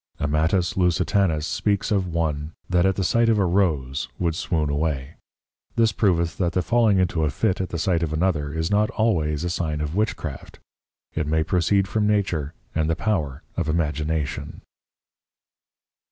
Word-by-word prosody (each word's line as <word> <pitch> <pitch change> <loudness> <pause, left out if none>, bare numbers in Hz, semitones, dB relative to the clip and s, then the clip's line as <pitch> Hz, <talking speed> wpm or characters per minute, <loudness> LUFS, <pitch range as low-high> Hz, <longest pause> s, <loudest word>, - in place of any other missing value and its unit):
Amatus 80 +5 +1
Lusitanus 90 -2 +2
speaks 100 +5 0
of 95 -3 +1
one 80 -2 -2
that 90 0 +3
at 95 - +1
the 95 - -1
sight 115 +5 +3
of 110 - +3
a 100 - +3
Rose 80 -10 0
would 85 -2 0
swoon 80 -1 -1
away: 70 -1 -2 0.6
This 115 -1 +3
proveth 85 -6 +1
that 90 -2 +1
the 90 - +1
falling 115 -1 +3
into 90 -3 +1
a 75 - +2
Fit 95 +6 0
at 95 - -3
the 85 - -3
sight 85 0 +1
of 80 -3 -1
another 80 -3 0
is 80 +4 -2
not 105 +1 +3
always 80 -9 0
a 90 - -1
sign 80 -4 -2
of 75 0 -3
Witchcraft. 90 -8 -3 0.6
It 80 -2 -2
may 80 +1 +2
proceed 95 +4 +2
from 105 0 0
Nature, 90 -8 0 0.2
and 80 0 0
the 80 - +2
Power 80 -9 -2
of 85 -3 -1
Imagination. 75 -2 -2
85 Hz, 170 wpm, -24 LUFS, 75-95 Hz, 0.6 s, that